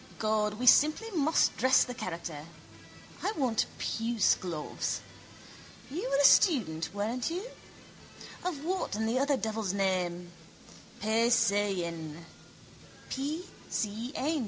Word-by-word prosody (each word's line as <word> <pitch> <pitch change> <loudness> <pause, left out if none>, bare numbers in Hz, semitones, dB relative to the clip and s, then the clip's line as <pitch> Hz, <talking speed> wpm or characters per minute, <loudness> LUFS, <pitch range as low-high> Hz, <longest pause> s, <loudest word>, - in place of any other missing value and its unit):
God, 215 -1 0
we 245 +4 -4
simply 310 - +5
must 315 -3 +2
dress 260 +1 +5
the 250 - -6
character. 165 -8 -6 0.8
I 420 - -1
want 250 -7 +1
puce 225 -1 +1
gloves. 165 -5 -3 0.9
You 295 -2 -3
were 275 - +2
a 285 - +3
student, 190 - +4
weren't 220 - -2
you? 355 +4 -3 1.0
Of 320 -5 -4
what 365 - -2
in 220 +1 -1
the 235 +3 +1
other 280 0 +2
devil's 220 -4 -2
name? 180 -3 -1 0.7
Paysayenn. 200 -8 +1 1.0
P. 300 +6 -3 0.2
C. 220 +3 -3
N. 305 +3 0
225 Hz, 115 wpm, -30 LUFS, 195-280 Hz, 1.0 s, simply